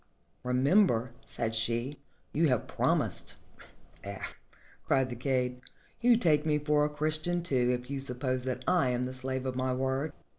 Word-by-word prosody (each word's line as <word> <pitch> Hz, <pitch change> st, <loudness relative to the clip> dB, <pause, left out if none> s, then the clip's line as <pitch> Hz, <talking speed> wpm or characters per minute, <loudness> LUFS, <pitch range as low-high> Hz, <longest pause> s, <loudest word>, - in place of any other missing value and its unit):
"Remember," 125 Hz, -, +3 dB, 0.2 s
said 115 Hz, -1 st, -2 dB
she, 120 Hz, +5 st, -1 dB, 0.3 s
"you 160 Hz, +2 st, +3 dB
have 125 Hz, -4 st, +1 dB
prom -, -, +2 dB
ised." -, -, -4 dB, 0.7 s
"Eh!" 100 Hz, 0 st, -5 dB, 0.7 s
cried 130 Hz, -1 st, +2 dB
the -, -, -3 dB
kaid, 125 Hz, 0 st, -1 dB, 0.4 s
"you 240 Hz, +1 st, +5 dB
must 235 Hz, -, +2 dB
take 150 Hz, -3 st, +4 dB
me 155 Hz, -1 st, +2 dB
for 150 Hz, 0 st, +2 dB
a 150 Hz, -, +2 dB
Christian, 155 Hz, +4 st, -1 dB
too, 125 Hz, -6 st, +1 dB
if 125 Hz, -, -13 dB
you 140 Hz, -, -2 dB
suppose 130 Hz, -1 st, -2 dB
that 130 Hz, 0 st, -3 dB
I 175 Hz, -8 st, +3 dB
am 125 Hz, 0 st, 0 dB
the 130 Hz, 0 st, -3 dB
slave 130 Hz, 0 st, -3 dB
of 130 Hz, -1 st, -2 dB
my 130 Hz, 0 st, 0 dB
word!" 135 Hz, +3 st, -1 dB
130 Hz, 175 wpm, -30 LUFS, 125-150 Hz, 0.7 s, you